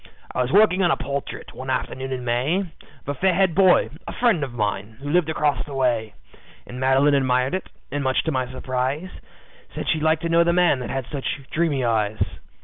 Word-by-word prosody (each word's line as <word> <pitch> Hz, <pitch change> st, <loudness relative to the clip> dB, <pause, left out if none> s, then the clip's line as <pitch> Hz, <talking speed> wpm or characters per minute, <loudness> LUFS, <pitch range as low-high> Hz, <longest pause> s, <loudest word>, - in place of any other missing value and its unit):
"I -, -, 0 dB
was 125 Hz, +1 st, -1 dB
working 195 Hz, -1 st, +5 dB
on 175 Hz, -, +3 dB
a -, -, +2 dB
portrait, 140 Hz, +1 st, -5 dB
one 130 Hz, +1 st, -7 dB
afternoon 130 Hz, +1 st, -2 dB
in 125 Hz, -1 st, -4 dB
May, 130 Hz, +10 st, +1 dB, 0.4 s
Of -, -, -10 dB
a -, -, 0 dB
fair 180 Hz, +5 st, +1 dB
haired 190 Hz, -2 st, +3 dB
boy, 185 Hz, +1 st, +4 dB, 0.2 s
a -, -, -5 dB
friend 230 Hz, -, +2 dB
of 135 Hz, -, -4 dB
mine, 105 Hz, -1 st, -3 dB
who 145 Hz, +1 st, -5 dB
lived 175 Hz, -1 st, +2 dB
across 150 Hz, -2 st, 0 dB
the 145 Hz, -, -9 dB
way. 120 Hz, -5 st, 0 dB, 0.5 s
And 125 Hz, -, -8 dB
Madeline 135 Hz, +2 st, +3 dB
admired 130 Hz, 0 st, +2 dB
it, 190 Hz, -, -3 dB, 0.2 s
and 145 Hz, 0 st, -2 dB
much 130 Hz, -1 st, +1 dB
to 160 Hz, -, -1 dB
my 130 Hz, -2 st, -2 dB
surprise, 130 Hz, +7 st, -2 dB, 0.6 s
Said -, -, -4 dB
she'd 155 Hz, -, +1 dB
like 160 Hz, +1 st, +2 dB
to 170 Hz, -, -2 dB
know 170 Hz, +1 st, +5 dB
the 170 Hz, 0 st, +2 dB
man 175 Hz, -6 st, +3 dB
that 125 Hz, -, -5 dB
had 135 Hz, -2 st, -3 dB
such 140 Hz, -1 st, -3 dB
dreamy 150 Hz, -6 st, +1 dB
eyes. 110 Hz, -2 st, 0 dB
140 Hz, 215 wpm, -23 LUFS, 125-165 Hz, 0.6 s, working